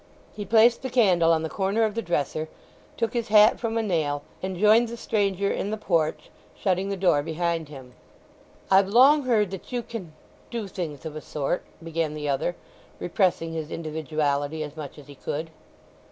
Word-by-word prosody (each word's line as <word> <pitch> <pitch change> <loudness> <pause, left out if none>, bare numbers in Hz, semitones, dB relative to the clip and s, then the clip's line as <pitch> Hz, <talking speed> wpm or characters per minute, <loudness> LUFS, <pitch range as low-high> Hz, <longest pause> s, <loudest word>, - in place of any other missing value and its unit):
He 205 -1 -6
placed 230 +3 +5
the 260 - -4
candle 185 -9 +4
on 160 -1 +2
the - - -1
corner 195 +6 0
of 215 -1 +1
the 230 - -2
dresser, 155 -3 -2 0.5
took 230 -1 -1
his 235 -2 -1
hat 210 +1 +6
from 230 -1 -2
a 225 - +1
nail, 150 -7 -1 0.2
and 190 -1 -4
joined 215 +4 +5
the 235 +1 -7
stranger 200 -3 0
in 200 - -2
the 215 - -2
porch, 165 -7 -1 0.3
shutting 190 0 0
the 200 - -2
door 175 -6 +3
behind 165 0 -2
him. 130 -4 -11 0.8
"I've 190 0 +6
long 265 +7 +6
heard 215 -6 +2
that 195 +4 -8
you 245 -1 -2
can—do 220 +2 -8
things 160 -7 -6
of 155 -1 -6
a 155 - -5
sort?" 150 +3 -2 0.2
began 165 -2 -2
the 150 -1 -4
other, 145 +5 0 0.4
repressing 175 -2 0
his 160 -1 -4
individuality 155 -2 -2
as 150 0 -8
much 150 -3 -8
as 145 - -12
he 145 - -12
could. 155 +4 -5
175 Hz, 180 wpm, -25 LUFS, 155-215 Hz, 0.8 s, hat